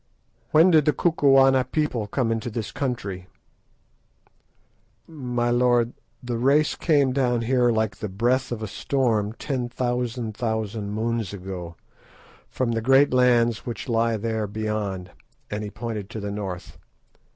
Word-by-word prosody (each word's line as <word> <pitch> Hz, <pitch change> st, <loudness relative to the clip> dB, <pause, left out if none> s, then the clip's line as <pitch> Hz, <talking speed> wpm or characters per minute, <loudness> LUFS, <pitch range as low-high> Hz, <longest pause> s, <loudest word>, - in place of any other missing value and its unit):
"When 165 Hz, +4 st, +6 dB
did 155 Hz, -3 st, +5 dB
the 150 Hz, -, +3 dB
Kukuana 135 Hz, -4 st, +4 dB
people 130 Hz, -5 st, -1 dB
come 115 Hz, +1 st, 0 dB
into 115 Hz, +1 st, -2 dB
this 110 Hz, -2 st, -4 dB
country?" 105 Hz, -9 st, -4 dB, 1.8 s
"My 125 Hz, -6 st, -2 dB
lord, 120 Hz, -1 st, +2 dB, 0.3 s
the 120 Hz, -2 st, -3 dB
race 140 Hz, +5 st, +3 dB
came 145 Hz, -6 st, +2 dB
down 125 Hz, -3 st, +1 dB
here 125 Hz, +1 st, +2 dB
like 110 Hz, -3 st, 0 dB
the 105 Hz, -, -5 dB
breath 120 Hz, +8 st, 0 dB
of 110 Hz, -2 st, -4 dB
a -, -, -3 dB
storm 110 Hz, -2 st, 0 dB
ten 125 Hz, -1 st, -3 dB
thousand 120 Hz, -2 st, -2 dB
thousand 110 Hz, -2 st, -3 dB
moons 115 Hz, -2 st, -2 dB
ago, 90 Hz, -3 st, -7 dB, 0.7 s
from 125 Hz, -2 st, -1 dB
the 115 Hz, -1 st, -1 dB
great 135 Hz, +4 st, +4 dB
lands 120 Hz, -3 st, +3 dB
which 120 Hz, -, -5 dB
lie 115 Hz, -1 st, +1 dB
there 110 Hz, 0 st, -2 dB
beyond," 105 Hz, -3 st, -3 dB, 0.4 s
and 105 Hz, +1 st, -3 dB
he 105 Hz, -, -4 dB
pointed 110 Hz, -2 st, -5 dB
to 110 Hz, -, -6 dB
the 100 Hz, -1 st, -4 dB
north. 95 Hz, -3 st, -6 dB
115 Hz, 140 wpm, -24 LUFS, 105-130 Hz, 1.8 s, When